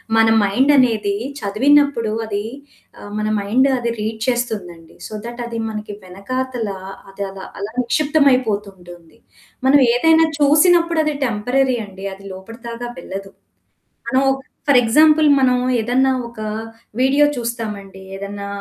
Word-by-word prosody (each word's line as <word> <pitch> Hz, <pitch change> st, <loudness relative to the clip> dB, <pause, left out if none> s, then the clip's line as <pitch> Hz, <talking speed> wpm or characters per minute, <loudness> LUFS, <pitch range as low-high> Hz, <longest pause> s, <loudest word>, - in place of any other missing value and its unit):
మన 225 Hz, 0 st, +5 dB
మైండనేది 230 Hz, -1 st, +3 dB, 0.3 s
చదివినప్పుడు 255 Hz, +2 st, +2 dB
అది 205 Hz, -1 st, -3 dB, 0.6 s
ఆహ్, 205 Hz, -, -10 dB
మన 215 Hz, 0 st, -1 dB
మైండ్ 225 Hz, +7 st, +2 dB
అది 235 Hz, -1 st, -2 dB
రీడ్ 220 Hz, +1 st, -3 dB
చేస్తుందండి. 205 Hz, -10 st, -3 dB
సో -, -, -11 dB
దట్ 240 Hz, +1 st, -7 dB
అది 235 Hz, -1 st, -6 dB
మనకి 215 Hz, -1 st, -6 dB
వెనకాతల 235 Hz, +6 st, -4 dB, 0.4 s
అది 200 Hz, +1 st, -5 dB
అలా, 195 Hz, -1 st, -9 dB
అలా 200 Hz, +2 st, -5 dB
నిక్షిప్తమైపోతుంటుంది. 215 Hz, -, 0 dB, 0.5 s
మనం 285 Hz, +2 st, +6 dB
ఏదైనా 320 Hz, +6 st, +4 dB
చూసినప్పుడది 315 Hz, +1 st, +4 dB
టెంపరరీ 250 Hz, +4 st, 0 dB
అండి. 195 Hz, -1 st, -10 dB
అది 195 Hz, +1 st, -14 dB
లోపటిదాకా 230 Hz, +4 st, -8 dB
వెళ్ళదు. 195 Hz, +2 st, -7 dB, 0.8 s
మనం 265 Hz, 0 st, +2 dB, 0.4 s
ఫర్ 275 Hz, -3 st, +6 dB
ఎగ్జాంపుల్ 305 Hz, +6 st, +5 dB
మనం 250 Hz, -1 st, +3 dB, 0.2 s
ఏదన్నా 250 Hz, +4 st, +2 dB, 0.2 s
ఒక 235 Hz, -1 st, -14 dB, 0.6 s
వీడియో 270 Hz, +3 st, +4 dB
చూస్తామండి. 215 Hz, -5 st, -5 dB
ఏదన్నా 200 Hz, +1 st, -6 dB
235 Hz, 115 wpm, -19 LUFS, 200-265 Hz, 0.8 s, మనం